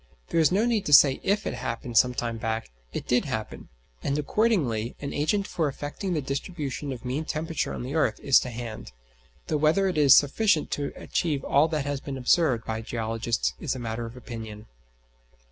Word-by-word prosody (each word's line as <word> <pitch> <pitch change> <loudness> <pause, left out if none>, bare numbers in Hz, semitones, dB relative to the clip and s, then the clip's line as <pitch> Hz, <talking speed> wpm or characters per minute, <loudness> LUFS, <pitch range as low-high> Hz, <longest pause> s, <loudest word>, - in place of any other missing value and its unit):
There 165 - +1
is 160 0 +4
no 205 +5 +2
need 230 -4 0
to 150 - +1
say 135 -1 +7
if 200 +2 0
it - - -2
happened 120 -1 -5
some 125 +2 +5
time 115 -2 -3
back: 110 - -3 0.2
it - - -5
did - - +2
happen, - - -5 0.3
and 140 - -1
accordingly 145 - 0
an 140 - -5
agent 195 +7 0
for 160 -5 -1
affecting 145 +7 -4
the 150 -4 -1
distribution 140 0 -4
of 125 -1 -7
mean 130 +5 -2
temperature 160 +1 -2
on - - -5
the 130 +3 -5
earth 160 -2 +1
is 140 - +5
to 125 - -5
hand; 115 - -7 0.5
though 155 - 0
whether 155 +6 +3
it 180 -5 0
is 140 -3 +8
sufficient 160 +3 +2
to 145 -1 -2
achieve 150 -5 -2
all 145 +3 +3
that 155 -3 -2
has 145 -1 -2
been 140 -2 -5
observed 130 -2 +2
by 110 0 -3
geologists 115 0 -2
is 140 -5 -2
a - - -5
matter 115 -1 -4
of 115 +2 -11
opinion. 110 -4 -8
140 Hz, 195 wpm, -26 LUFS, 120-160 Hz, 0.5 s, is